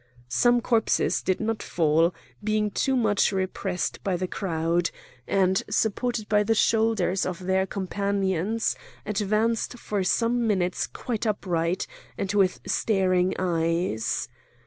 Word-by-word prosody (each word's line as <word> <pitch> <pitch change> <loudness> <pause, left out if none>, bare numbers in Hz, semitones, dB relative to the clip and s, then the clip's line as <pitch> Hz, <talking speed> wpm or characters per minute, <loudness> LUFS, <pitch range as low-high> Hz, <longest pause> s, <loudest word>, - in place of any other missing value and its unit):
Some 240 - +3
corpses 225 -2 +1
did 185 - 0
not 225 0 -1
fall, 165 +1 +2 0.3
being 215 0 +1
too 265 +6 +1
much 215 -4 +2 0.2
pressed 185 -3 -3
by 190 -3 0
the 185 +1 -2
crowd, 170 -2 0 0.4
and, 190 -1 +2
supported 220 +1 0
by 210 -1 +3
the 225 +2 +2
shoulders 220 -5 +2
of 185 0 -4
their 190 +1 +1
companions, 200 +1 -1 0.3
advanced 215 +3 0
for 205 -4 -2
some 235 +4 +1
minutes 185 -4 0
quite 230 -2 -3
upright 175 -4 0 0.3
and 195 0 -2
with 195 -3 +2
staring 185 -3 +1
eyes. 165 -8 0
195 Hz, 125 wpm, -26 LUFS, 180-220 Hz, 0.4 s, Some